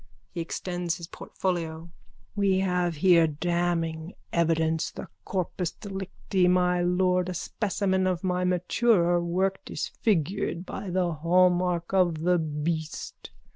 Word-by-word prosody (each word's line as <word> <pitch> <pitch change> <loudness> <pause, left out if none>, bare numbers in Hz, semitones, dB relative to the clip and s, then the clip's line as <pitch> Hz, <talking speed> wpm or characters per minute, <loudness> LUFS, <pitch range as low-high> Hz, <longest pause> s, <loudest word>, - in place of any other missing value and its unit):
(He 170 - -4
extends 175 +1 -3
his 170 - -7
portfolio.) 165 -2 -4 0.5
We 195 -2 +2
have 180 -3 0
here 170 0 +5
damning 165 +1 -1 0.2
evidence, 160 -1 +1
the - - -9 0.2
corpus 180 -2 -2
delicti, 190 -2 -2
my 180 0 +3
lord, 180 0 +2
a 185 - -4
specimen 190 0 0
of 180 -1 -1
my 180 -1 0
maturer 180 0 +2
work 190 +3 0
disfigured 185 -2 -1
by 195 - -6
the 180 -1 +1
hallmark 175 +2 +2
of 175 -4 +2
the 180 0 +3
beast. 160 +1 -4
180 Hz, 120 wpm, -27 LUFS, 170-185 Hz, 0.5 s, here